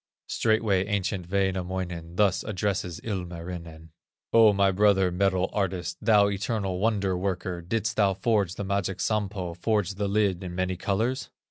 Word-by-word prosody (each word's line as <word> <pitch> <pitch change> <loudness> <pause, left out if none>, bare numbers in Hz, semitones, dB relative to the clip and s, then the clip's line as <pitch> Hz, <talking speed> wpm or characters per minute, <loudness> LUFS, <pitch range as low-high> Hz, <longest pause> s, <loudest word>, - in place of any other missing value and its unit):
Straightway 110 -4 +1
ancient 95 -3 -2
Wainamoinen 95 -3 -2
Thus 95 -1 +2
addresses 95 -4 -2
Ilmarinen: 85 -5 -6 0.4
"O 115 -2 +7
my 100 -1 +3
brother, 95 -1 +3
metal 95 0 +1
artist, 95 -3 -2
Thou 105 -3 +5
eternal 95 -1 -2
wonder 100 -3 +1
worker, 90 -1 -2
Didst 105 +4 -2
thou 100 -3 +3
forge 100 -5 +1
the 100 - -4
magic 95 -1 -1
Sampo, 100 -5 -1
Forge 100 +2 0
the 100 +1 -2
lid 100 -3 +1
in 90 -1 -6
many 95 0 -1
colors?" 110 +8 -1
95 Hz, 140 wpm, -27 LUFS, 90-105 Hz, 0.4 s, O